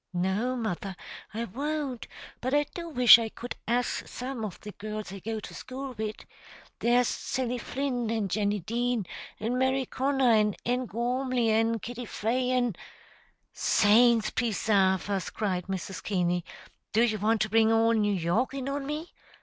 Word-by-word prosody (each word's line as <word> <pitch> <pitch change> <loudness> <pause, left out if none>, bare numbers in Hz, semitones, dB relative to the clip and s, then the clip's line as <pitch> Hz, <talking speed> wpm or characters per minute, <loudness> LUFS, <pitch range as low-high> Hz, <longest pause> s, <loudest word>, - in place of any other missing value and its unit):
"No, 190 +8 0
mother, 200 -5 -3 0.4
I 225 +2 -3
won't; 280 +2 -3 0.3
but 255 +3 0
I 295 - +4
do 340 -1 -6
wish 245 -5 +9
I 225 -1 -2
could 245 +3 -7
ax 240 +2 0
some 250 -2 -5
of 205 -4 -5
the 210 - -7
girls 210 -1 -6
I 195 - -7
go 220 +3 -4
to - - -9
school 265 +1 -6
wid. 215 0 -5 0.5
There's 245 +1 +3
Sally 250 -1 -2
Flynn, 250 -3 -2
and 220 -3 0
Jenny 205 +1 0
Dean, 235 +2 -1 0.3
an' 235 +4 -1
Mary 260 0 +2
Connor, 265 -2 +2
and 210 -2 +3
Ann 250 +1 0
Gormly, 245 +1 0
an' 225 +1 +2
Kitty 245 +2 -6
Fay, 245 +4 -1
an' 245 -5 +1 0.5
" - - -39
"Saints 225 +1 +4
presarve 200 -5 +2
us!" 195 -3 -1
cried 185 -4 -2
Mrs. 190 0 -5
Keaney. 180 -3 0 0.5
"Do 225 +2 +4
you 215 -3 +1
want 220 +2 +2
to 215 - +1
bring 225 0 +5
all 225 0 +4
New 210 -3 +2
York 195 +10 0
in 270 -1 -4
on 275 0 -3
me? 305 +3 -4
230 Hz, 165 wpm, -28 LUFS, 210-250 Hz, 0.5 s, wish